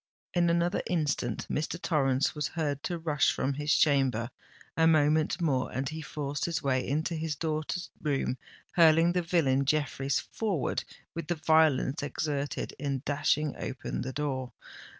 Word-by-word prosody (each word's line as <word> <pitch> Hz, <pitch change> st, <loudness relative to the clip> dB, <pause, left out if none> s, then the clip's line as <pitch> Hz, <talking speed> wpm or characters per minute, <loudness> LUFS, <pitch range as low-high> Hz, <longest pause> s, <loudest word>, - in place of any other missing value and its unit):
In 175 Hz, -1 st, +3 dB
another 170 Hz, +2 st, +1 dB
instant 150 Hz, -9 st, -1 dB
Mr. 160 Hz, +3 st, -2 dB
Torrens 140 Hz, -5 st, +1 dB
was 150 Hz, -2 st, -2 dB
heard 145 Hz, -4 st, -2 dB
to 175 Hz, +2 st, -3 dB
rush 155 Hz, -4 st, +2 dB
from 140 Hz, -, -1 dB
his 150 Hz, +2 st, -1 dB
chamber—a 135 Hz, +3 st, 0 dB
moment 155 Hz, +2 st, +3 dB
more, 140 Hz, -7 st, 0 dB
and 135 Hz, +1 st, -2 dB
he 160 Hz, +1 st, -6 dB
forced 145 Hz, -1 st, -3 dB
his 170 Hz, -2 st, -2 dB
way 130 Hz, -2 st, +1 dB
into 155 Hz, +5 st, -1 dB
his 160 Hz, -1 st, -2 dB
daughter's 155 Hz, +3 st, -3 dB
room, 135 Hz, -4 st, -1 dB, 0.3 s
hurling 165 Hz, -1 st, +5 dB
the 180 Hz, -, +1 dB
villain 160 Hz, -6 st, +2 dB
Jeffreys 140 Hz, -2 st, 0 dB
forward 195 Hz, -, -2 dB, 0.3 s
with 165 Hz, -2 st, -5 dB
the 175 Hz, -, 0 dB
violence 155 Hz, -2 st, +3 dB
exerted 145 Hz, 0 st, -3 dB
in 135 Hz, -2 st, -2 dB
dashing 150 Hz, 0 st, +1 dB
open 130 Hz, -1 st, -4 dB
the 130 Hz, -, -3 dB
door. 130 Hz, -2 st, -3 dB
150 Hz, 150 wpm, -29 LUFS, 135-160 Hz, 0.3 s, hurling